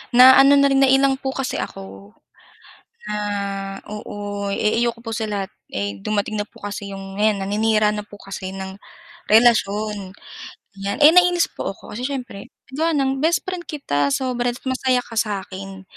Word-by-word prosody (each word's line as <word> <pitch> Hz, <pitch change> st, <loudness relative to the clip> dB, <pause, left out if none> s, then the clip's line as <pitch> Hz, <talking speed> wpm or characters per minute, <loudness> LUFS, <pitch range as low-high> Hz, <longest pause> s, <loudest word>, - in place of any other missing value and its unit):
na 260 Hz, +2 st, +9 dB
ano 275 Hz, +1 st, +7 dB
na 280 Hz, 0 st, +4 dB
rin 270 Hz, -, +3 dB
na -, -, +5 dB
ilang 270 Hz, 0 st, +3 dB
po 265 Hz, 0 st, -4 dB
kasi 270 Hz, -1 st, -2 dB
ako, 95 Hz, +1 st, -8 dB, 0.9 s
na 210 Hz, -, -4 dB, 0.7 s
oo 205 Hz, -1 st, -5 dB
eh 215 Hz, +3 st, +1 dB
ayoko 235 Hz, -1 st, 0 dB
po 225 Hz, -, -4 dB
sa 220 Hz, 0 st, -3 dB
lahat 200 Hz, -2 st, -3 dB, 0.2 s
ay 100 Hz, 0 st, -4 dB
dumating 210 Hz, -, -1 dB
na 205 Hz, -, -7 dB
po -, -, -18 dB
kasi 205 Hz, 0 st, -6 dB
'yong 195 Hz, +1 st, -7 dB
ngayon 215 Hz, -1 st, +3 dB
naninira 215 Hz, +1 st, +2 dB
na 210 Hz, -, -3 dB
po 205 Hz, 0 st, -14 dB
kasi 195 Hz, -1 st, -7 dB
ng 190 Hz, +1 st, -8 dB, 0.5 s
relasyon 210 Hz, -3 st, +3 dB, 0.7 s
ganyan 200 Hz, +1 st, -3 dB
eh 300 Hz, -, +10 dB
nainis 355 Hz, -1 st, +5 dB
po -, -, -4 dB
ako -, -, -14 dB
kasi 245 Hz, -, -5 dB
syempre 255 Hz, -7 st, -6 dB, 0.3 s
gawa 320 Hz, +4 st, +1 dB
ng 270 Hz, -1 st, +1 dB
bestfriend 345 Hz, +2 st, 0 dB
kita 145 Hz, -, -1 dB
sobra 245 Hz, -2 st, -1 dB
masaya 260 Hz, -1 st, 0 dB
ka 230 Hz, -2 st, -6 dB
sakin. 195 Hz, -2 st, -4 dB
215 Hz, 165 wpm, -21 LUFS, 195-260 Hz, 0.9 s, eh